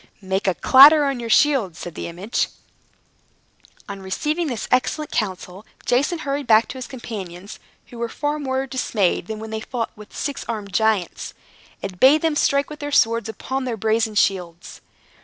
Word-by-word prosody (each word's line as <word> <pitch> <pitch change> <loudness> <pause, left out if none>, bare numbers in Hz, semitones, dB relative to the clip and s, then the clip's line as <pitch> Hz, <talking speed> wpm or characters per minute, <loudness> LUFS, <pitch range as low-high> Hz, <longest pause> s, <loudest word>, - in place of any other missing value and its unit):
"Make 190 +1 -2
a 185 - +2
clatter 290 - +7
on 275 -3 -1
your 235 -1 -5
shields," 230 - +3
said 175 - -7
the - - -6
image. 180 +7 -2 1.4
On 200 -2 -7
receiving 300 - -2
this 240 -6 -4
excellent 295 +4 0
counsel, 190 -2 -3 0.2
Jason 285 +8 +1
hurried 280 -1 -2
back 220 0 +5
to 260 - -7
his 255 - -6
companions 200 -7 -8 0.3
(who 240 - -11
were 235 0 -2
far 295 +5 -2
more 265 -1 -2
dismayed 220 -9 -1
than 220 - -5
when 220 +1 -8
they 220 - -3
fought 235 -1 -4
with 210 0 -13
the - - -17
six 285 -1 -3
armed 210 -3 -5
giants), 220 -5 0 0.5
and 185 -2 -6
bade 290 +4 +6
them 320 -2 +1
strike 280 0 +1
with 300 - -8
their 290 -1 -5
swords 230 -3 +2
upon 260 +5 -4
their 240 -3 -3
brazen 220 +1 0
shields. 180 -4 -1
230 Hz, 175 wpm, -22 LUFS, 200-275 Hz, 1.4 s, clatter